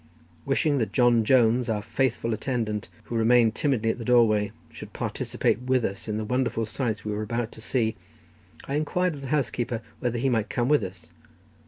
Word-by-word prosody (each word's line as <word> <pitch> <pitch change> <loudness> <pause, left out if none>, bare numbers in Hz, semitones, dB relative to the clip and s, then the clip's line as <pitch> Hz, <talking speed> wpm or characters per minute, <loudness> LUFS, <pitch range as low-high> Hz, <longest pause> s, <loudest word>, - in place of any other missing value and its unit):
Wishing 140 +1 +2
that 110 - -2
John 120 -2 +4
Jones, 120 0 +3
our 105 -2 -1
faithful 115 -1 0
attendant, 110 -2 -2
who 120 - -6
remained 115 0 +4
timidly 115 -5 +1
at - - -7
the - - -5
doorway, 110 -4 +3 0.2
should - - -10
participate 120 - -1
with 125 -1 +1
us 100 +3 -5
in 105 -1 -2
the 110 - -3
wonderful 120 -1 0
sights 110 -1 -3
we 105 - -2
were 105 +1 -2
about 115 +1 -2
to 110 - -12
see, 110 -1 0 0.7
I 140 - -3
inquired 175 +4 0
of 145 - -8
the 135 - -6
housekeeper 120 -5 -1 0.2
whether 120 -1 -1
he 130 +3 0
might 115 -4 +1
come 120 +1 0
with 150 -1 +4
us. 90 -3 -8
120 Hz, 190 wpm, -26 LUFS, 110-130 Hz, 0.7 s, John